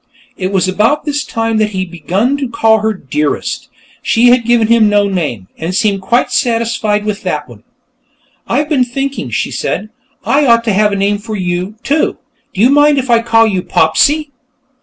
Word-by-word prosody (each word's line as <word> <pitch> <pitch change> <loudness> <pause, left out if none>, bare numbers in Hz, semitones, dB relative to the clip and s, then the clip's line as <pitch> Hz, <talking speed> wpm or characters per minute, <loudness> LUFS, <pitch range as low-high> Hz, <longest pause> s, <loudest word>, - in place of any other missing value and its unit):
It 185 0 -3
was 190 -1 +1
about 225 +11 +1
this 295 0 -1
time 225 -1 -2
that 215 -1 +1
he 190 -2 -3
had 185 -2 -5
begun 185 - -1
to 275 -3 -3
call 225 -1 +2
her 220 +1 0
Dearest. 150 -6 -3 0.3
She 240 +2 +3
had 245 -1 +3
given 235 -1 +3
him 225 -1 +4
no 205 -1 +2
name, 150 - -3
and 170 +3 -3
seemed 205 -2 +1
quite 240 +6 0
satisfied 230 -3 0
with 210 -1 -3
that - - -3
one. - - -14 0.9
"I've 295 - 0
been 290 -5 +2
thinking," 270 +3 -4
she - - -2
said, 215 - -3 0.4
"I 285 0 +2
ought 230 -1 +4
to 225 -3 0
have 210 +1 +2
a - - -1
name 200 +1 0
for 215 +1 -6
you, 180 +1 -3
too. 300 +2 0 0.3
Do 195 - -3
you 245 +4 +5
mind 290 0 +4
if 260 -2 -1
I 230 -1 +4
call 225 -1 +3
you 195 -4 0
Popsy?" 285 - +1
220 Hz, 195 wpm, -13 LUFS, 195-245 Hz, 0.9 s, you